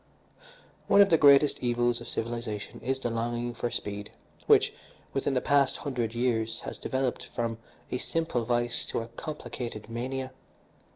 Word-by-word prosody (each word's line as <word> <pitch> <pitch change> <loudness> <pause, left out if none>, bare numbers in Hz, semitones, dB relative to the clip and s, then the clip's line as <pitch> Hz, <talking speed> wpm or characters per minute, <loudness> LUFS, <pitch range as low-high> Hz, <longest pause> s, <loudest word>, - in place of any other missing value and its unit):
"One 200 - +5
of 200 -2 +7
the 165 - +7
greatest 140 0 +6
evils 120 -1 +1
of 120 - -7
civilisation 115 -3 -3
is 130 +1 -1
the 120 -2 -2
longing 120 +1 -2
for 120 +1 -2
speed, 105 -2 -5 0.4
which, - - +5 0.4
within 135 0 0
the 125 - +2
past 140 -2 +3
hundred 120 -5 -2
years, 115 -2 0
has - - -6
developed 130 -1 -1
from 115 -1 -1 0.3
a 125 - -1
simple 160 -7 -1
vice 120 0 0
to - - -1
a 115 - -8
complicated 120 -5 -6
mania. 130 +3 -3
120 Hz, 155 wpm, -29 LUFS, 115-135 Hz, 0.4 s, of